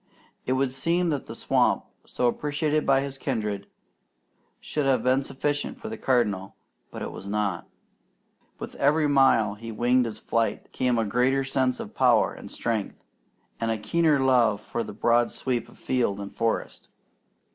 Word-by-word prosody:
It 130 - +2
would 130 0 0
seem 170 +6 +1
that 145 -4 -2
the - - -7
swamp, - - +1 0.2
so 125 - -1
appreciated 150 +4 0
by 135 0 +4
his 135 -1 -6
kindred, 105 -7 -2 0.9
should 150 -2 -2
have 130 -4 +2
been 130 +2 +3
sufficient 145 +2 -3
for 220 - -6
the 225 - -5
Cardinal, 105 -7 0 0.3
but - - -7
it - - -5
was 100 - -9
not. 100 -4 -2 0.9
With - - -7
every 150 +2 +3
mile 135 -7 +4
he 115 +2 -8
winged 120 +3 +2
his 110 -2 -5
flight, 115 -1 -1
came 125 -2 0
a 115 - +1
greater 125 +5 +2
sense 130 -1 0
of - - -7
power - - +3
and - - -10
strength, 110 -4 -3 0.6
and 115 - -1
a 110 - 0
keener 150 +7 +2
love 125 -6 +3
for 110 - -4
the 115 - -5
broad 120 +3 +2
sweep 125 -2 -2
of - - -18
field 120 -6 0
and 100 0 -7
forest. 115 0 -2
125 Hz, 170 wpm, -26 LUFS, 110-135 Hz, 0.9 s, by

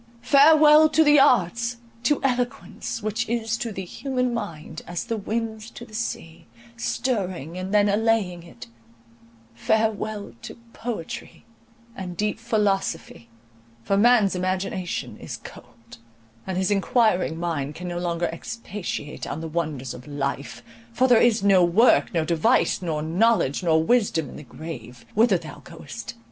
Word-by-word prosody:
Farewell 305 +3 +7
to 320 - +4
the 295 -1 +6
arts,—to 235 - +1
eloquence, 245 -3 -2
which 215 +2 -2
is 225 -1 -1
to 230 -1 -4
the 190 -2 -6
human 250 +4 -2
mind 160 -8 -6
as 175 -1 -3
the 230 -1 -3
winds 220 +1 -4
to 240 - -10
the 220 - -18
sea, 190 -7 -5 0.3
stirring, 190 - -2
and 185 +1 -5
then 205 0 +4
allaying 205 -4 +1
it;—farewell 115 - -5
to - - -9 0.2
poetry 225 -9 -6 0.5
and 180 -2 -7
deep 210 +1 -1
philosophy, 200 - -1 0.5
for 195 - +1
man's 220 -1 +4
imagination 185 0 -3
is - - -7
cold, 115 +1 -14 0.5
and 190 -1 -2
his 190 +1 0
enquiring 195 -5 +2
mind 150 -4 -3
can 180 - -7
no 175 0 -3
longer 175 -1 -1
expatiate 190 -5 -6
on 145 - -4
the 165 - -5
wonders 155 -6 -3
of 125 - -11
life, 140 -4 -4 0.3
for 260 - +2
"there 245 -3 +5
is 230 -4 +3
no 195 -3 +5
work, 190 +8 +4
nor 165 -3 0
device, 170 +10 +2
nor 155 -4 -2
knowledge, 175 - +2
nor 160 -3 +3
wisdom 205 -7 +1
in - - -11
the - - -8
grave, 125 -5 -9
whither 220 -3 +4
thou 165 -2 -10
goest!" 140 -9 -9
190 Hz, 140 wpm, -24 LUFS, 160-230 Hz, 0.5 s, Farewell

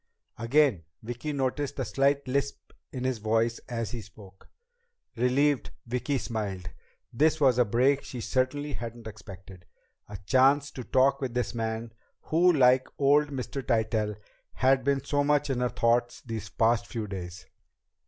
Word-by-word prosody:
Again 120 - +2 0.2
Vicki 120 +6 -5
noticed 140 0 -2
the 130 - -2
slight 140 +5 +1
lisp 140 +2 -3 0.2
in 130 -2 -5
his 130 -3 -1
voice 115 +2 0
as 115 -2 -3
he 120 -2 -5
spoke. 100 -2 -16 0.7
Relieved, 130 +3 +1 0.2
Vicki 125 +4 -1
smiled. 100 -7 -4 0.4
This 155 +6 +2
was 130 -4 +4
a 125 - +5
break 130 +6 +2
she 125 - -7
certainly 135 +5 -1
hadn't 115 -1 -7
expected 95 -4 -11 0.4
a 105 - -7
chance 135 +4 +3
to 125 - -7
talk 135 +3 +2
with 125 -3 -3
this 125 -2 -1
man, 115 0 -3 0.3
who 175 +3 +3
like 130 -4 +4
old 145 +1 +4
Mr. 135 0 -5
Tytell, 110 -3 0 0.4
had 130 0 +2
been 140 0 +1
so 145 0 0
much 145 0 +1
in 125 - -1
her 125 0 +1
thoughts 120 0 +1
these 110 -3 -5
past 115 +3 +1
few 115 -3 -4
days. 95 -3 -7
125 Hz, 155 wpm, -28 LUFS, 115-140 Hz, 0.7 s, a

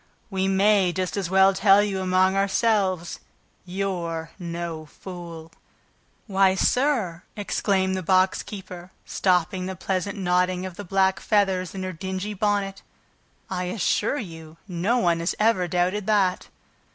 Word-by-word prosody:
"We 190 0 0
may 195 -1 +3
just 185 0 -2
as 195 -4 -2
well 190 +1 +5
tell 195 +1 +5
you, 195 -2 -2
among 185 +1 +2
ourselves... 195 -3 +1 0.5
you're 175 -4 -3
no 170 -2 -5
fool!" 170 -1 -9 0.7
"Why, 195 -2 +3
sir," 230 - +1 0.2
exclaimed 190 -2 0
the 185 - -2
box 185 +2 +2
keeper, 185 -3 -9 0.2
stopping 180 0 0
the 190 - -4
pleasant 190 +3 -2
nodding 180 0 +1
of 185 -2 -7
the 205 - -7
black 190 0 +2
feathers 190 -4 +1
in 190 - -4
her 185 0 -4
dingy 190 +4 -4
bonnet, 200 -1 -1 0.7
"I 180 -1 -3
assure 210 +6 0
you 165 - -8
no 185 +6 0
one 170 -7 +2
has 170 +2 -1
ever 210 -4 +3
doubted 180 +4 0
that!" 195 -4 +2
190 Hz, 140 wpm, -24 LUFS, 180-195 Hz, 0.7 s, well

